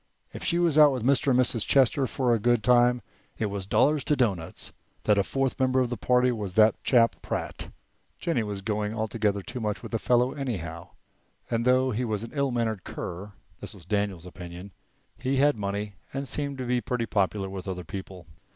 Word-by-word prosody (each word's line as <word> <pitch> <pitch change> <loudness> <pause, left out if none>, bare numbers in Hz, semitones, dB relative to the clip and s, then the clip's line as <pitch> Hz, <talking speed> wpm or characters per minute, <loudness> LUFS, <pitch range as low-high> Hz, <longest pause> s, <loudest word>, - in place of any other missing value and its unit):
If - - -7
she 170 - +1
was 170 -3 +3
out 150 -1 +8
with 130 -4 -3
Mr. 135 +2 +2
and 125 -1 +4
Mrs. 120 -3 +2
Chester 135 0 +3
for 125 -1 +1
a 115 - +2
good 120 0 +2
time, 125 0 +4 0.3
it 110 - -1
was 100 -1 -4
dollars 145 +7 +3
to 150 - +2
doughnuts 100 - -1 0.3
that 105 -1 +3
a - - +3
fourth 135 +5 -1
member 130 0 +3
of 125 -1 0
the - - -1
party 125 +1 +2
was 105 -6 -4
that 110 -1 +6
chap 115 -3 +4
Pratt. - - -4 0.5
Jennie 165 -9 0
was 100 -2 -4
going 105 0 -2
altogether 110 -2 -1
too 125 - -6
much 105 -3 -3
with - - -8
the 115 - -1
fellow 125 +2 +2
anyhow, 85 - -5 0.6
and 115 0 0
though 130 +1 +3
he 120 +3 -1
was 110 -3 -2
an 115 - -8
ill 140 -2 +1
mannered 115 -5 -1
cur 95 +4 -6 0.3
(this - - -8
was 90 -4 -15
Daniel's 100 -3 -1
opinion), 90 +1 -9 0.5
he 130 +1 0
had 145 +1 +4
money, 100 0 -3 0.2
and 135 0 -3
seemed 140 -1 -3
to 130 - -4
be 125 0 +1
pretty 120 +1 -2
popular 100 -2 0
with 95 0 -7
other 90 -1 -4
people. 95 -2 -8
115 Hz, 205 wpm, -27 LUFS, 100-130 Hz, 0.6 s, out